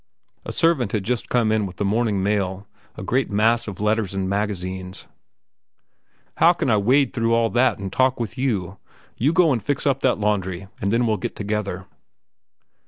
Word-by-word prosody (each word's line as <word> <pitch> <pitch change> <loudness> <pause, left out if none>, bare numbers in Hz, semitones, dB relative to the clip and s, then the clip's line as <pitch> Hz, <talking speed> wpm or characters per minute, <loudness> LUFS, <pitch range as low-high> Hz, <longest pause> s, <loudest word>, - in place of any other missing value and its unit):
A - - -4
servant 150 -11 +1
had 105 -3 0
just 120 +2 -2
come 115 -3 +2
in 110 -2 +1
with 90 - -10
the 100 - -2
morning 105 -1 0
mail, 100 -1 -1 0.3
a 105 - -7
great 130 +7 0
mass 115 +3 +2
of 100 -3 -7
letters 105 -2 0
and 95 -1 -1
magazines. 95 -2 -3 1.3
"How - - +6
can - - -1
I 110 - +4
wade 130 +6 +2
through 115 -1 +1
that 125 +3 +2
and 95 -1 -6
talk 130 -1 +2
with 115 -3 -4
you? 100 -8 -2 0.4
You 140 +6 +2
go 170 -2 +4
and 120 -4 0
fix 145 +1 -2
up 135 -2 +2
that 130 - +2
laundry, 100 -3 -2
and 100 - 0
then 120 +2 +2
we'll 110 -2 +1
get - - -5
together." 105 -3 -3
105 Hz, 180 wpm, -22 LUFS, 100-120 Hz, 1.3 s, How